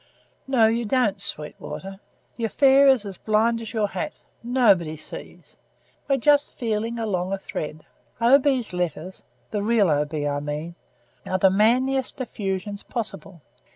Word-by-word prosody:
"No, 255 -4 +4
you 230 +2 +1
don't, 215 -4 +1
Sweetwater. 190 +3 -4 0.4
The 230 - -2
affair 275 +4 +5
is 260 -6 +4
as 195 -3 -8
blind 225 +2 +1
as 225 - -7
your 215 -3 0
hat; 185 - -5 0.2
nobody 205 -10 +2
sees. 155 - -11 0.5
We're 275 - +3
just 290 +2 +3
feeling 230 0 -2
along 195 -4 -2
a - - 0
thread. 155 -4 -6 0.3
O. 240 +4 +6
B.'s 260 -7 0
letters 180 0 -4 0.3
the 205 - -1
real 210 -4 +3
O. 150 0 +2
B., 150 -1 -4
I 145 0 -1
mean, 150 +3 -5 0.5
are 185 - -1
the 190 0 +4
manliest 255 +7 +2
effusions 200 -4 -4
possible. 195 -6 -6
210 Hz, 150 wpm, -24 LUFS, 180-240 Hz, 0.5 s, O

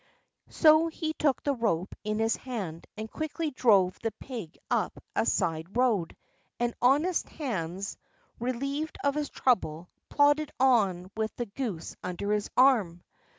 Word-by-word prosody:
So 315 0 +5
he 315 -1 -3
took 285 -4 +1
the 285 - +1
rope 210 -7 -1
in 215 0 -1
his 225 0 +2
hand, 195 -11 -6
and 215 +1 -4
quickly 315 0 -3
drove 200 -8 +3
the 225 - 0
pig 220 - -8
up - - 0 0.2
a - - +1
side 165 +5 -1
road; 225 -10 +1 0.4
and 240 0 0
honest 295 +8 +3
Hans, 195 - -4 0.4
relieved 275 +6 -2
of 280 - +2
his 300 0 -2
trouble, 175 -9 0 0.2
plodded 290 +1 +3
on 200 -8 +3
with 220 0 -2
the 240 - -3
goose 205 -6 -5
under 180 +3 -3
his 210 -1 0
arm. 220 -10 +4
235 Hz, 145 wpm, -29 LUFS, 190-280 Hz, 0.4 s, So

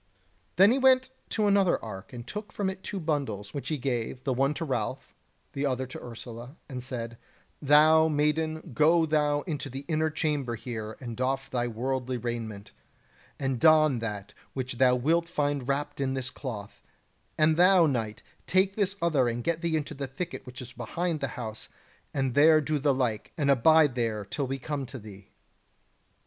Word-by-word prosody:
Then 195 +4 +7
he 265 - +2
went 260 0 +4 0.2
to 215 - +1
another 200 -3 +4
ark, 95 -2 -8
and 120 -2 -8
took 210 +8 -6
from 195 -2 -1
it 190 0 -10
two 200 - -4
bundles, 140 - -2
which 140 - -5
he 155 - -1
gave, 125 -1 -3
the 135 - 0
one 135 +4 +1
to 165 - -3
Ralph, 135 - -3 0.4
the 140 +1 -1
other 130 -1 -1
to 130 - -9
Ursula, 120 +2 -9
and 130 -3 -6
said: 115 -2 -5 0.4
"Thou, 155 +2 +6
maiden, 155 +1 0
go 160 +5 +4
thou 150 -1 +1
into 145 -3 -4
the 135 +2 -7
inner 155 0 +1
chamber 145 -5 -1
here 110 -2 -6
and 120 -3 -6
doff 130 +2 -2
thy 120 -1 0
worldly 125 +2 -2
raiment, 110 -3 -5 0.7
and 135 -3 -1
don 155 -4 +5
that 105 -3 -5 0.2
which 130 -2 -4
thou 125 -1 +5
wilt 165 +7 +1
find 145 -5 -1
wrapped 140 0 -2
in 135 -1 0
this 130 -1 -3
cloth; 110 -7 -7 0.6
and 155 0 +4
thou, 180 0 +6
knight, 115 -7 -2 0.2
take 190 +1 +2
this 200 -2 0
other 145 -7 +3
and 120 0 -2
get 170 +3 -1
thee 170 -2 0
into 150 0 -4
the 140 -1 -5
thicket 165 +4 -6
which 125 0 -7
is 125 - -11
behind 165 +7 -2
the 140 - -1
house, 110 -3 -6 0.4
and 135 -3 -1
there 155 +3 +6
do 155 0 -1
the 140 +1 +3
like, 125 -5 -1
and 140 -2 +3
abide 150 +2 +5
there 115 -4 -1
till 135 +7 -3
we 135 +1 -2
come 140 0 -4
to 130 - -8
thee." 100 -3 -12
135 Hz, 185 wpm, -28 LUFS, 120-155 Hz, 0.7 s, Then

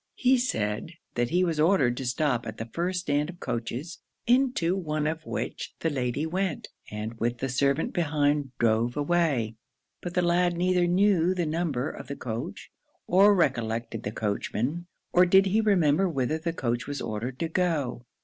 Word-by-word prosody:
He 255 0 +3
said, 110 - -2 0.2
that 120 0 0
he 180 +1 +2
was 165 -4 0
ordered 150 -7 +3
to 130 - -3
stop 125 -1 0
at 110 - -6
the 115 - -4
first 175 +9 -2
stand 150 -2 0
of 180 -1 -10
coaches, 125 +7 -4 0.3
into 245 -8 +2
one 155 -5 -2
of 160 +1 -3
which - - -4
the 165 - +1
lady 130 +2 -1
went, 185 +1 -2 0.2
and, 110 +2 -6
with 120 +1 0
the 135 +2 -3
servant 140 +4 +1
behind, 145 -3 +1
drove 115 +2 +1
away; 145 -8 +1 0.4
but 175 0 -6
the 180 - +2
lad 175 0 +2
neither 180 0 +2
knew 185 -1 +3
the 175 -2 0
number 155 -4 -1
of - - -10
the 140 - -5
coach, 125 - -6 0.3
or 200 +3 +5
recollected 115 - 0
the 105 - -4
coachman, 120 +10 -2 0.3
or 180 - +7
did 190 +2 +5
he 205 +3 +2
remember 190 -4 +3
whither 145 0 -1
the 165 +1 -2
coach 120 -6 -2
was 145 -1 -4
ordered 115 +4 -4
to 165 - -1
go. 150 -9 -1
155 Hz, 175 wpm, -27 LUFS, 120-175 Hz, 0.4 s, or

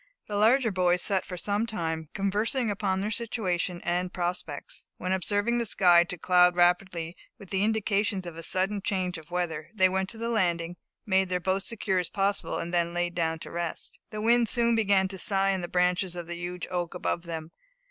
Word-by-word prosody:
The 210 - -4
larger 225 +3 +4
boys 180 -2 +2
sat 195 -3 0
for 180 -2 -6
some 205 +5 -1
time, 160 -7 -3
conversing 210 +4 0
upon 190 -2 -1
their 210 +2 -2
situation 185 -7 -1
and 180 +1 -1
prospects, 175 -5 -4
when 185 - -3
observing 205 +5 +1
the 235 - 0
sky 175 -4 +5
to 180 0 -5
cloud 180 +1 +4
rapidly 175 -1 +1 0.2
with 195 - -14
the 195 0 +1
indications 210 -2 +1
of 170 -2 -7
a 165 - -7
sudden 190 +4 0
change 185 -3 -1
of 155 - -16
weather, 170 -3 -3
they 185 -3 +5
went 190 +1 -1
to 225 - -5
the 230 +1 -3
landing, 175 -6 0 0.3
made 190 -3 +2
their 180 0 0
boat 190 +2 0
secure 195 -3 0
as 175 -2 -1
possible, 200 0 -1
and 170 +1 -4
then 170 0 +1
laid 175 0 0
down 165 -2 0
to - - -8
rest. 170 -1 -5
The 215 -1 -5
wind 235 0 +4
soon 235 -1 +3
began 200 -4 +3
to 190 0 -5
sigh 195 0 +2
in 190 -1 -1
the 175 - -4
branches 180 +1 +1
of 175 -1 -5
the 175 +1 -5
huge 175 +1 -5
oak 175 -1 -2
above 175 -1 -1
them. 165 -2 -6
185 Hz, 205 wpm, -28 LUFS, 175-205 Hz, 0.3 s, sky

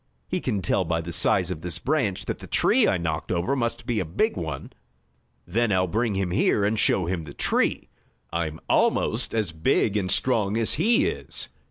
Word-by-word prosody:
He 180 0 -2
can 105 -7 -2
tell 95 - +1
by 80 -1 -1
the 85 +1 -6
size 90 +1 +2
of 80 -4 -5
this 85 -2 -4
branch 130 -10 -1
that - - -4
the - - -10
tree - - +3
I - - +2
knocked 80 -2 -3
over 90 +10 0
must 120 -2 -2
be 120 -3 0
a - - 0
big 80 -1 0
one. - - -5 0.7
Then 115 0 0
I'll 95 -1 +3
bring 110 +3 -1
him 95 -2 -1
here 100 +3 +2
and 105 +1 0
show 95 -4 +3
him 85 -1 -2
the 75 -2 -10
tree. - - +1 0.5
I'm 80 -2 -2
almost - - +2
as 110 -6 0
big 80 +6 +1
and 95 -3 0
strong 110 -4 +2
as 115 -1 +1
he 230 +1 +3
is." - - -4
95 Hz, 200 wpm, -25 LUFS, 85-115 Hz, 0.7 s, tree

